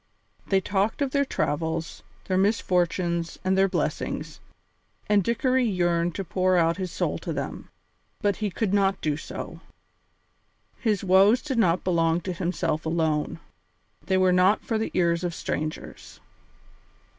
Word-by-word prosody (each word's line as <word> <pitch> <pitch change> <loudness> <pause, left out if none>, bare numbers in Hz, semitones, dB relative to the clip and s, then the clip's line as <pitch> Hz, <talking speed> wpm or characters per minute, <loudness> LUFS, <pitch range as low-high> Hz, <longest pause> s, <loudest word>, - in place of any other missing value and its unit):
They 195 - +3
talked 200 +8 0
of 270 - -2
their 280 0 +2
travels, 160 - -2 0.2
their 185 - -1
misfortunes 180 -4 0
and 190 0 +2
their 195 0 +4
blessings, - - -3 0.7
and 205 -2 +3
Dickory 255 +4 +1
yearned 175 -5 +1
to 195 - -3
pour 185 0 +1
out 165 0 +2
his 185 -3 -4
soul - - -2
to - - -5
them, - - -5 0.5
but 205 -1 0
he 210 -2 -1
could 195 +1 -2
not 195 -1 +2
do 150 -2 0
so. 155 - -7 1.2
His 215 -5 0
woes 195 +6 +5
did 265 -5 -1
not 180 -5 +2
belong 165 -2 +2
to 185 +1 -4
himself 170 -3 -2
alone; 160 -2 -1 0.7
they 190 0 +2
were 185 -1 +4
not 185 +3 +3
for 225 -2 -1
the 220 - -1
ears 170 -1 +2
of 175 -2 -2
strangers. 155 0 -5
185 Hz, 145 wpm, -26 LUFS, 170-205 Hz, 1.2 s, woes